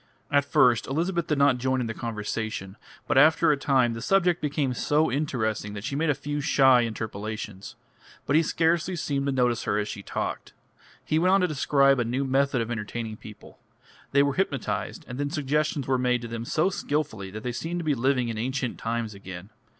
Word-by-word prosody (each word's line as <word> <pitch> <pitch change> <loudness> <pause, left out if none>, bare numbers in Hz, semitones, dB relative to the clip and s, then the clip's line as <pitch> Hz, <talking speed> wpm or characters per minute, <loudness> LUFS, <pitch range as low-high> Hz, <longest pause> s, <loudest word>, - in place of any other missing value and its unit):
At 145 0 +3
first 125 -4 +3
Elizabeth 170 +4 -1
did 150 - 0
not 140 -3 +4
join 130 +1 0
in 125 - -1
the 115 - -3
conversation, 110 -3 -4 0.3
but 145 - +4
after 155 +1 +5
a - - +3
time 130 -4 +2
the 115 - -6
subject 180 +4 +2
became 145 -3 -1
so 150 +4 +1
interesting 110 -7 -2
that 100 - -6
she 135 +4 -3
made 160 +2 0
a 145 - +3
few 145 +2 -4
shy 135 -3 +5
interpolations. 110 -2 -6 0.5
But 140 - +1
he 160 - +6
scarcely 165 +2 +1
seemed 140 -4 -2
to - - +1
notice 125 -3 +1
her - - +1
as 105 0 -2
he 100 - -8
talked. - - -4 0.5
He 155 - +1
went 185 +3 +4
on 195 - +3
to 180 - +3
describe 140 -3 +3
a - - +2
new 125 +4 -1
method 135 -1 +1
of 115 +1 -4
entertaining 110 0 -4
people. 105 -1 -13 0.5
They 140 0 +5
were 140 -1 +1
hypnotised, 115 - -2
and 125 +1 -7
then 145 0 -1
suggestions 150 -1 -1
were 130 -1 +1
made 125 -1 +1
to - - -4
them 115 0 -5
so 160 +9 +1
skilfully 145 - -2
that 110 +3 -8
they 125 - -2
seemed 165 +8 -4
to - - -7
be 150 - +2
living 130 -1 +1
in 110 -1 -4
ancient 130 +1 -2
times 115 -1 -2
again. 95 0 -10
130 Hz, 205 wpm, -26 LUFS, 115-150 Hz, 0.5 s, he